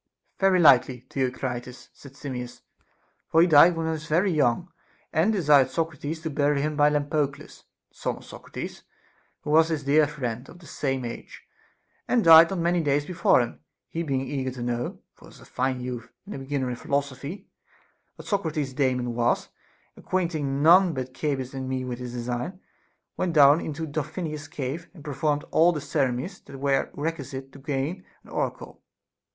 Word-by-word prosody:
Very 190 -1 +4
likely, 130 -5 +5
Theocritus, 125 -1 -3
said 140 -2 -14
Simmias; 125 -4 -6 0.7
for 160 - +4
he 170 - +7
died 170 +1 +7
when 165 0 -2
he 160 - 0
was 155 -1 -5
very 180 +5 +2
young, 155 +3 +1 0.4
and 170 +7 +3
desired 150 -9 +4
Socrates 160 +1 -3
to 160 -2 -4
bury 145 0 +1
him 150 +1 -1
by 145 0 +5
Lampo 150 0 +1
cles. 140 +2 -14 0.3
the - - -33
son - - -2
of - - -14
Socrates, - - -8 0.6
who 150 - -4
was 160 +1 +5
his 155 -3 -2
dear 145 +2 +4
friend, 125 -4 -5
of 170 - -13
the 175 - -16
same 135 -4 -2
age, 120 - -8 0.6
and 240 -3 +2
died 165 0 +9
not 195 - -3
many 170 +1 +1
days 145 -1 +1
before 170 -6 +3
him. 120 - -5 0.3
He 165 - -3
being 135 -5 -1
eager 135 -1 -3
to 125 -1 -6
know 120 0 -3
(for - - -18
he - - -14
was - - -16
a - - -15
fine 130 0 -2
youth, 125 -2 -6
and 205 - -8
a - - -6
beginner 135 -1 -2
in 120 - -5
philosophy) 140 +8 -3 0.7
what - - -12
Socrates's 160 - -1
Daemon 130 -3 0
was, 120 0 0 0.5
acquainting 155 -7 -2
none 175 +1 +6
but 130 0 -5
Cebes 135 -4 -2
and 130 -1 -5
me 130 -1 -2
with 125 -1 -5
his 125 -1 -6
design, 125 +9 -4 0.6
went 175 -2 -1
down 145 +1 +6
into 160 +1 -4
Tro 155 0 -2
phonius's 155 -1 -5
cave, 145 +5 -5
and 155 - -13
performed 145 +1 -1
all 170 +2 +5
the 160 - -3
ceremonies 140 +4 -2
that 135 - -12
were 135 0 +1
requisite 135 -3 -5
to 140 - -13
gain 145 +6 -3 0.2
an - - -18
oracle. - - -4
145 Hz, 180 wpm, -26 LUFS, 130-160 Hz, 0.7 s, died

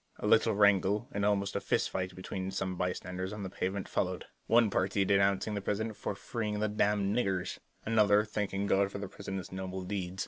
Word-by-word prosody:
A - - -5
little 110 0 +4
wrangle 100 +2 +3
and 100 - -2
almost 100 -1 +1
a - - +2
fist - - 0
fight 90 -1 -3
between 95 0 -4
some 95 -1 -2
bystanders 90 +1 -3
on 105 -1 -5
the 95 - -5
pavement 95 0 -2
followed; - - -1 0.2
one 115 -2 +5
party 95 +1 +1
denouncing 100 +1 +2
the 100 - -2
President 110 +2 -2
for 100 - -4
freeing 105 0 -3
the 110 - +1
"damned 105 -1 +1
niggers"; 95 -7 -1 0.3
another 105 -1 +4
thanking 100 -2 -2
God 100 0 +2
for - - -5
the 100 0 -4
President's 95 -1 -6
noble 95 0 -4
deed. 95 -1 -4
100 Hz, 195 wpm, -31 LUFS, 95-105 Hz, 0.3 s, one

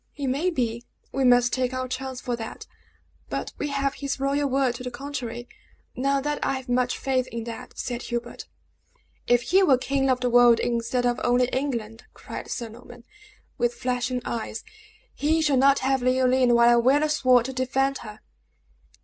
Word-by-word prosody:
"He 285 - -5
maybe; 255 -5 -1 0.3
we 270 - -1
must 245 -1 +4
take 255 0 0
our 255 0 -2
chance 260 0 -5
for 245 -2 -3
that; 225 -1 -8 0.6
but - - -4
we - - -1
have 275 -1 -1
his 280 -1 -4
royal 280 +1 0
word 265 -2 +1
to 240 - -8
the 250 - -4
contrary. 245 -2 -6 0.5
Not 275 +1 0
that 295 0 -2
I - - +1
have 265 -1 -5
much 250 0 0
faith 260 -1 0
in 230 0 -5
that!" 230 0 -9
said 240 -1 -4
Hubert. 240 0 -5 0.8
"If 245 0 +3
he 380 +8 +3
were 280 -9 +5
king 270 +1 0
of 255 -1 +2
the 250 - +1
world 240 -1 +6
instead 240 +1 -1
of 245 0 0
only 245 +1 +3
England," 235 -5 -3
cried - - -8
Sir 235 -2 -4
Norman, 240 +1 -13 0.6
with 240 0 +1
flashing 250 0 -2
eyes, 225 -1 -4 0.5
"he 315 +3 +1
shall 295 -4 +2
not 275 +2 +5
have 265 -1 +2
Leoline 255 -1 +3
while 235 0 +6
I 240 - +5
wear 265 +5 +3
a - - +2
sword 255 -5 +3
to 265 - -4
defend 265 +1 0
her!" 215 -1 -10
255 Hz, 185 wpm, -25 LUFS, 240-270 Hz, 0.8 s, world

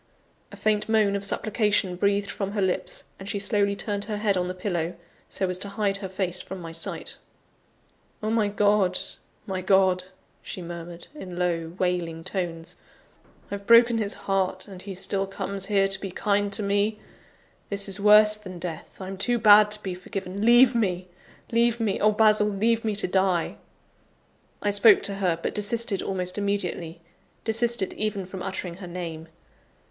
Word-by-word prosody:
A - - -9
faint 215 0 0
moan 215 -3 +3
of 200 - -3
supplication 200 -2 +1
breathed 200 +2 +1
from 200 0 -4
her 210 - -1
lips; 185 -1 -2 0.2
and 195 +1 -8
she 205 - -1
slowly 200 0 +1
turned 205 -1 -3
her 210 -2 -3
head 205 -1 +1
on 180 -1 0
the 185 - -4
pillow, 175 -3 -2 0.3
so 190 - -2
as 180 0 -3
to 200 - -5
hide 200 -1 -1
her 195 -1 -6
face 185 -1 -2
from 190 0 -8
my 165 -2 -7
sight. 165 0 -4 1.1
"Oh, 215 - 0
my 220 -2 +2
God! 205 -2 +2 0.5
my 190 -3 -3
God!" 185 -1 +3 0.4
she - - -7
murmured, 170 0 -8
in 185 -12 -8
low, 170 -2 -1
wailing 175 -3 -1
tones, 175 -2 -4 0.7
"I've 200 0 -6
broken 235 0 +6
his 205 -1 -1
heart, 190 -1 -1
and 190 -3 -10
he 195 -1 -7
still 195 +1 -1
comes 195 0 -4
here 200 -2 +3
to 195 - +1
be 195 - -4
kind 205 +2 0
to 210 - -1
me! 205 +2 +1 0.7
This 200 0 -2
is 195 +1 -1
worse 210 +1 +6
than 185 -4 -9
death! 170 -2 -7
I'm 190 0 -6
too 240 +5 +1
bad 210 -1 +7
to 210 0 -3
be 190 - -3
forgiven 185 +2 -5
leave 240 +2 +6
me! 185 -6 -1 0.4
leave 235 0 +2
me! 215 -4 0
oh, 215 - +4
Basil, 215 -1 +4
leave 220 +3 +1
me 215 -2 -1
to 215 - -1
die!" 185 -2 +1 1.1
I 205 - +2
spoke 205 +1 +6
to 200 - +1
her; 180 -4 +1
but - - -3
desisted 210 -1 0
almost 185 0 -2
immediately 180 -4 -2 0.4
desisted 230 -2 +1
even 210 -3 -2
from 185 0 -8
uttering 185 -2 -4
her 190 -2 -8
name. 165 -2 -6
200 Hz, 175 wpm, -25 LUFS, 185-210 Hz, 1.1 s, bad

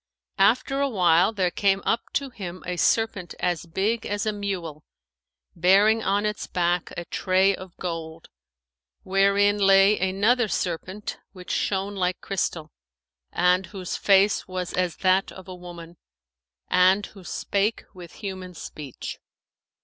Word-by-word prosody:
After 255 +7 +3
awhile, 185 -8 +3
there 185 -5 0
came 195 0 +1
up 230 - +1
to 275 -2 -2
him 185 -5 -8
a 180 0 -3
serpent 200 -3 0
as 175 -1 -1
big 210 +7 -1
as 205 0 -2
a 215 - 0
mule, 180 -7 -5 0.7
bearing 200 +6 +4
on 200 0 0
its 210 0 -3
back 175 -1 0
a 175 - -4
tray 190 +3 +2
of 185 -2 -10
gold, 165 -2 -6 0.8
wherein 200 +2 +3
lay 195 +1 +5
another 205 +6 +2
serpent 185 +2 -4
which 180 -2 -8
shone 195 +1 -1
like 180 -1 -1
crystal 170 -5 -3 0.6
and 180 +1 +2
whose 185 -1 -5
face 200 +1 +3
was 185 -1 -4
as 180 -2 0
that 185 +1 +3
of 190 0 -12
a 185 - -7
woman[FN#511] 175 -1 -11 0.7
and 185 +3 +4
who 195 -3 -14
spake 200 +4 -1
with 175 -3 -12
human 185 -2 -6
speech. 145 -4 -8
190 Hz, 135 wpm, -25 LUFS, 180-205 Hz, 0.8 s, lay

